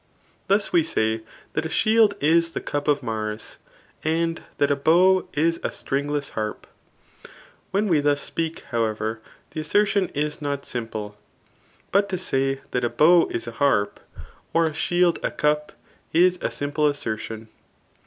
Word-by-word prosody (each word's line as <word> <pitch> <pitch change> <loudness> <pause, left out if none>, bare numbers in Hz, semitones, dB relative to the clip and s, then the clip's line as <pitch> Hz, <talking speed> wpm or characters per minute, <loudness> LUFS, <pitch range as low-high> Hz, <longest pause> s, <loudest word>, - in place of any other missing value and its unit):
Thus 200 0 +2
we 170 - +6
say 110 -8 0 0.3
that - - -1
a 160 - -3
shield 220 +2 +4
is 165 +2 +3
the - - -2
cup 145 0 -3
ofMars^ 110 -7 -2 0.5
and 165 +1 0 0.2
that 145 0 +2
a 140 -1 0
how 185 +3 +5
is 165 +3 +1
a - - -2
stringtess 145 +1 -2
harp* 110 -1 -4 1.0
When 200 +2 +1
we 165 -6 +3
thus 145 0 +2
speak, 165 +2 -3
however, 110 -1 -1 0.3
the - - -5
assertion 195 +3 +2
is 150 +1 -2
not 140 -1 -3
sim 120 -2 -4
pie. 105 -2 -5 0.8
But 200 +1 +3
to 185 - -1
say 135 -5 -1
that 125 - -1
a 120 - +2
bow 170 +5 +5
is 115 - -3
a 115 - -5
harpy 105 -6 +1 0.5
or 165 0 +4
a 160 - -1
shield 175 +2 +2
a - - 0
ctgf^ 150 0 0 0.4
is 180 +2 +4
a - - 0
simple 145 +1 0
assertion. 110 -5 -4
150 Hz, 155 wpm, -24 LUFS, 120-170 Hz, 1.0 s, we